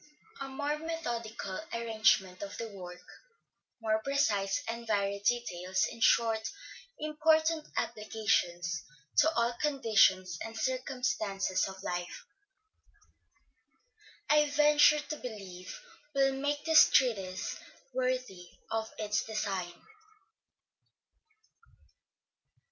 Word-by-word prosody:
A 275 - -4
more 290 +2 -2
methodical 235 -11 -4
arrangement 220 -5 +2
of 200 0 -6
the 230 -1 -5
work, 180 -3 -10 0.8
more 220 -1 0
precise 220 -9 +1
and 230 0 -5
varied 200 -1 0
details, 185 -6 0
in - - -11
short, 225 -2 +4 0.6
important 315 +1 +2
applications 185 -6 -1 0.3
to 305 +2 +6
all 235 +1 +2
conditions 220 -10 +3
and 225 0 -7
circumstances 220 -8 -1
of 190 0 -9
life, 175 -1 -4 2.0
I 300 0 +4
venture 295 +1 +5
to 300 +1 -6
believe, 195 - -8 0.4
will 270 0 +3
make 285 +2 -2
this 320 -1 +7
treatise 195 -8 +1 0.3
worthy 255 -8 -2 0.2
of 225 0 -2
its 210 -1 0
design. 195 -5 -4
225 Hz, 90 wpm, -31 LUFS, 195-275 Hz, 2.0 s, this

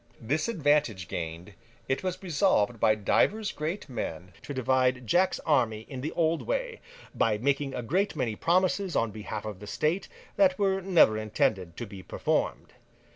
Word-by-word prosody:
This 145 - -1
advantage 145 - +1
gained, 85 +4 -5 0.3
it 135 - 0
was 185 +1 -4
resolved 145 - +2
by 110 - +4
divers 200 - +1
great 160 +5 -4
men 90 - -5
to - - -8
divide 130 -1 +1
Jack's 180 - +2
army 120 -8 +1
in 130 -2 -6
the 155 +4 -3
old 165 -1 +1
way, - - -3 0.3
by 110 -2 +2
making 135 +3 0
a 125 - -3
great 185 - 0
many 115 -7 -1
promises 185 - +1
on 115 -1 +1
behalf 105 0 -6
of 105 -3 -6
the 105 - -10
state, 155 - -1 0.3
that 190 -2 +4
were 195 -1 +1
never 170 - +4
intended 100 -5 -1
to 120 - -4
be 100 -3 -10
performed. - - -2
135 Hz, 165 wpm, -28 LUFS, 110-180 Hz, 0.3 s, by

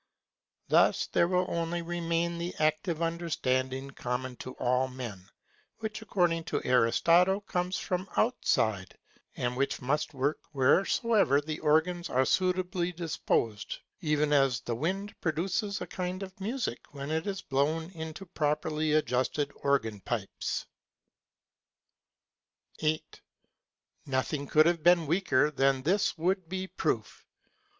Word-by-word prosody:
Thus - - +4
there 170 - +2
will 180 0 +2
only 170 0 -2
remain 170 0 -1
the 175 +1 -4
active 155 +2 0
understanding 135 -5 -1
common 125 0 -3
to 130 - -7
all 125 +1 +1
men, 120 -8 -8 0.5
which 220 0 -5
according 175 -6 +1
to - - -1
Aristotle 170 - +4
comes 180 -1 -2
from 185 +1 -3
outside, 110 - +1 0.4
and 125 0 -1
which 135 +2 0
must 145 +3 -1
work 140 +3 0
wheresoever 175 - +3
the 155 +1 -5
organs 160 +3 +2
are 130 +1 +2
suitably 180 0 +1
disposed; 155 - -1 0.2
even 150 -4 +1
as 135 -4 +3
the 120 - -3
wind 195 - -2
produces 190 +5 -1
a - - -2
kind 185 +1 -4
of 190 0 -10
music 230 - -2
when 140 +1 -5
it 160 +4 -1
is 195 -1 -3
blown 155 +5 0
into 160 +2 -7
properly 155 -2 0
adjusted 140 0 +1
organ 115 -7 +1
pipes. 105 -1 -3 2.1
8. 155 0 -2 0.9
Nothing 140 +2 -1
could 155 0 +5
have 170 -1 +2
been 175 0 +5
weaker 150 -3 +2
than 135 -2 +2
this 190 +6 +1
would 180 +1 0
be 190 0 -3
proof. - - -2
160 Hz, 125 wpm, -30 LUFS, 135-180 Hz, 2.1 s, could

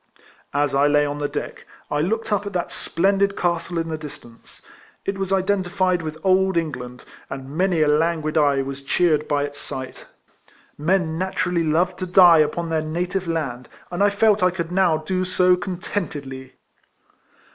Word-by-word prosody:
As 145 0 +1
T 135 - 0
lay 145 0 +3
on 145 0 -4
the 145 - -1
deck, - - -6 0.2
I 145 - 0
looked 220 +7 -1
up 205 0 -1
at 200 - -6
that 175 -1 -2
splendid 195 +3 +1
castle 170 0 -1
in 165 0 -2
the 160 -1 -4
distance. 130 -6 -12 0.4
It 195 0 -2
was 195 0 -2
identified 185 -2 +1
with 155 -1 -5
old 190 -1 +3
England, 125 -7 -4 0.3
and 135 +1 -7
many 180 -2 +2
a - - +2
languid 155 +1 +1
eye 145 -3 +3
was 135 0 -6
cheered 150 +2 +1
by 145 -1 +1
its 145 0 -6
sight. 130 -1 -7 0.7
Men 160 0 0
naturally 180 -2 0
love 170 +4 +1
to 185 - -4
die 175 -2 +7
upon 165 +2 0
their 160 -1 0
native 175 +4 -3
land, 140 -7 -3 0.2
and 180 +3 0
I 205 - +5
felt 205 0 +3
I 180 - +5
could 170 -2 -4
now 180 -3 +3
do 185 +4 -2
so 185 0 +3
contentedly 150 -8 -5
170 Hz, 170 wpm, -22 LUFS, 150-185 Hz, 0.7 s, die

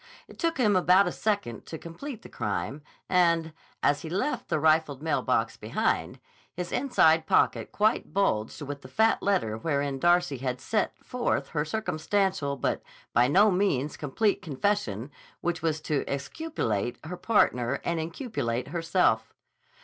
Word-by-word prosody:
It - - -15
took 330 -3 0
him 215 -6 +3
about 185 +2 +5
a - - -1
second 200 - -2
to 160 - -6
complete 225 - -8
the - - -9
crime, 110 +5 -3 0.3
and, 170 -3 +2 0.3
as 145 0 +3
he 165 - -6
left 245 - -1
the - - +1
rifled 155 -2 +2
mail 160 - +1
box - - 0
behind, - - -1 0.4
his 180 0 -4
inside 165 - +3
pocket - - +2
quite 215 -4 +1
bulged 150 - 0
with 145 0 -6
the 130 - -11
fat 220 +12 +2
letter 185 - +1
wherein 140 0 -1
Darcy 175 -3 +3
had 125 -1 -2
set 215 +9 -1
forth 250 -1 -1
her 150 -2 -1
circumstantial 190 -3 -1
but - - -1 0.3
by 120 +1 +5
no 200 +9 +5
means 165 -7 +1
complete 200 +9 0
confession 145 - -1 0.3
which 175 0 -1
was 160 -1 0
to 150 -2 -1
exculpate 140 - -2
her 175 +3 -5
partner 140 - +2
and 170 -1 0
inculpate 160 - -3
herself. 165 -9 +1
165 Hz, 150 wpm, -28 LUFS, 140-200 Hz, 0.4 s, about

